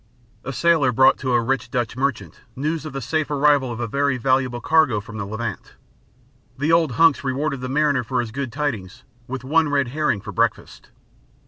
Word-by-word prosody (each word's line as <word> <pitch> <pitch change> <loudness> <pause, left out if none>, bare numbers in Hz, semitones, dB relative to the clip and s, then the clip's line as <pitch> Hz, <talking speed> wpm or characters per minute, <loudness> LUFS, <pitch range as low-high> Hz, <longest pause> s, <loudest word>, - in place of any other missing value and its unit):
A 135 - -4
sailor 160 -2 +3
brought 130 +3 +4
to 130 -2 -1
a 120 - +4
rich 135 +3 -1
Dutch 120 -3 -2
merchant 125 - -3
news 155 +3 -2
of 150 - -9
the 135 - -4
safe 155 +5 -1
arrival 145 -3 +2
of 115 - -6
a 120 - -1
very 140 +3 0
valuable 130 0 0
cargo 150 -4 +3
from 105 +1 -9
the 100 - -3
Levant. 110 0 -6 0.8
The 145 +4 0
old 165 -5 +3
hunks 160 +3 +4
rewarded 140 +1 -2
the 130 - -4
mariner 145 -2 +1
for 125 +2 -2
his 120 -2 -3
good 130 +1 -4
tidings 120 -10 -4 0.2
with 130 0 -5
one 155 +3 +2
red 140 -3 +1
herring 150 -5 0
for 100 +1 -8
breakfast. 90 - -2
130 Hz, 195 wpm, -22 LUFS, 120-145 Hz, 0.8 s, brought